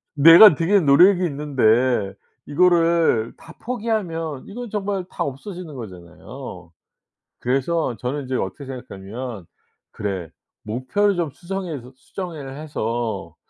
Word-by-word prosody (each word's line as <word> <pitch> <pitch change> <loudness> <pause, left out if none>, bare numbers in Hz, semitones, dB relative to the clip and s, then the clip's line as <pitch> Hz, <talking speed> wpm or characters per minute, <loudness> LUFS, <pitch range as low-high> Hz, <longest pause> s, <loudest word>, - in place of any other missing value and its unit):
내가 165 +5 +9
들인 175 +2 +2
노력이 180 +6 +6
있는데 125 -8 +1 0.3
이거를 165 -7 +3
다 165 - -14
포기하면 195 - -3
이건 235 +2 -7
정말 200 -3 -2
다 - - -3
없어지는 155 +3 -7
거잖아요. 95 -1 -10 0.7
그래서 135 +1 0
저는 130 +6 -4
이제 130 0 -3
어떻게 130 +8 -4
생각하냐면 120 -4 -7 0.5
'그래 95 -6 -4 0.3
목표를 130 - 0
좀 165 -5 -2
수정해서 170 -9 -6
수정을 145 -2 -7
해서 115 - -4
140 Hz, 270 characters per minute, -22 LUFS, 120-175 Hz, 0.7 s, 내가